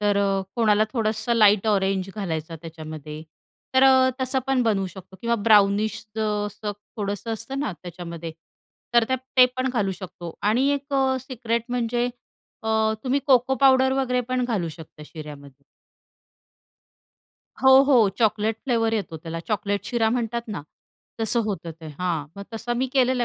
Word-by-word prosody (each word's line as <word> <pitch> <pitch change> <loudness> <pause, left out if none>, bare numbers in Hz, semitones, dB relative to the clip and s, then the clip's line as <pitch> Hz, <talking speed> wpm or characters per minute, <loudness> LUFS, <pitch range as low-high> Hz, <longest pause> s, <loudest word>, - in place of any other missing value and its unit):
तर 205 -1 +2
अ, 195 -1 +1
कोणाला 215 -2 +4
थोडंसं 225 0 -1
लाईट 210 -2 +5
ऑरेंज 195 -2 +1
घालायचं 165 -5 -4
त्याच्यामध्ये, 155 -2 -8 0.5
तर 260 - +5
अ, 260 -1 +6
तसं 260 +1 +1
पण 270 -2 +2
बनवू 205 -5 +1
शकतो 190 +1 -12
किंवा 235 0 +1
ब्राउनिश 210 +1 +4 0.2
असं 210 -1 -2 0.2
थोडंसं 205 +2 -3
असतं 225 +5 -5
ना, 285 -8 -2
त्याच्यामध्ये 170 -2 -7 0.6
तर 235 -1 +6
त्या 260 - +1 0.2
ते 255 - +9
पण 255 0 0
घालू 205 -6 0
शकतो 175 -2 -8
आणि 235 +7 +2
एक 280 +1 -7
अ, 265 -1 +2
सिक्रेट 235 -3 -3
म्हणजे 240 0 0 0.6
अ, 220 - -4 0.4
तुम्ही 270 +2 +1
कोको 260 -1 +4
पावडर 265 -1 +5
वगैरे 255 -2 +1
पण 255 0 0
घालू 210 -9 -1
शकता 155 -1 -11
शिऱ्यामध्ये. 145 -3 -11 2.0
हो, 265 - +7
हो, 255 -7 +5
चॉकलेट 220 -1 +1
फ्लेवर 230 -4 +1
येतो 195 -7 -3
त्याला 165 +1 -6
चॉकलेट 205 -1 -1
शिरा 230 -2 +1
म्हणतात 235 0 -1
ना, 195 -8 -5 0.6
तसं 225 +2 +2
होतं 195 -5 -4
ते, 160 - -9
हां. 170 -5 -1
मग 200 - -6
तसा 225 +2 -3
मी 255 +2 0
केलेलं 255 -2 +2
215 Hz, 150 wpm, -24 LUFS, 190-250 Hz, 2.0 s, ते